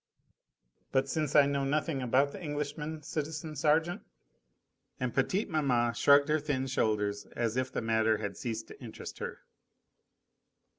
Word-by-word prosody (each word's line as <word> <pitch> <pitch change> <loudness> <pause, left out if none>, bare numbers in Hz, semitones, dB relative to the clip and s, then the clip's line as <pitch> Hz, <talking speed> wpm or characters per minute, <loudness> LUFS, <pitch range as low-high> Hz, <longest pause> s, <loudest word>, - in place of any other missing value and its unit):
"But 135 0 +2
since 150 0 -1
I 145 -2 +8
know 140 0 0
nothing 145 0 0
about 130 +3 +2
the 195 - -9
Englishman, 150 0 -4
citizen 155 +1 -4
sergeant 160 +4 +2 0.5
?" - - -47
And 125 -2 -2
petite 185 - +1
maman 130 - +1
shrugged 140 +4 +5
her 155 0 +2
thin 145 -3 -1
shoulders 105 -5 0
as 115 -1 -1
if 130 0 -1
the - - -3
matter 110 -1 +2
had 100 -1 -4
ceased 115 -2 -4
to - - -12
interest 115 - -8
her. - - -6
140 Hz, 150 wpm, -31 LUFS, 120-150 Hz, 0.5 s, I